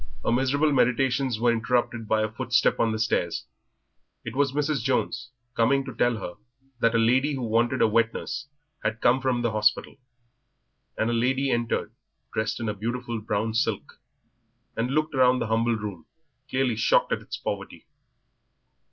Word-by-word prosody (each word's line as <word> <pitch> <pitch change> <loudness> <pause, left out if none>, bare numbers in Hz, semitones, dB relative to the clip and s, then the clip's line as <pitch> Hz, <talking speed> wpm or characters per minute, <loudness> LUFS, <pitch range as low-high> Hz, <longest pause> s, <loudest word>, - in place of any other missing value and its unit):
Her - - +2
miserable 140 +5 +2
meditations 130 -1 +2
were 120 0 +3
interrupted 115 0 0
by 110 0 +2
a 110 - -2
footstep - - +1
on 115 - +2
the 110 - -2
stairs. 85 -10 -1 0.8
It 115 0 -6
was 140 -1 +2
Mrs. 145 +1 0
Jones, 125 -2 -1 0.3
coming 135 +4 +2
to 130 - -6
tell 120 -1 +1
her 90 -4 -7 0.4
that 115 0 +2
a - - +5
lady 130 +6 +3
who 130 - -4
wanted 120 +3 +2
a - - +5
wet 115 +1 +2
nurse 135 +3 -5 0.4
had 110 +1 -1
come 125 +3 +3
from 125 -2 0
the 120 - +1
hospital; 105 +3 +1 1.0
and 110 +1 +1
a - - 0
lady 130 +3 +1
entered 120 -1 -1 0.4
dressed 110 0 -1
in 115 - -3
a 105 - 0
beautiful 120 +2 -4
brown 110 +1 -1
silk, 115 -3 -2 0.8
and 115 +2 -1
looked 155 +3 0
around 130 -1 +4
the 120 - -1
humble 115 +1 +1
room, 100 -7 -6 0.4
clearly 130 -3 +1
shocked - - +3
at - - 0
its - - -7
poverty. - - -5
120 Hz, 170 wpm, -26 LUFS, 110-130 Hz, 1.0 s, a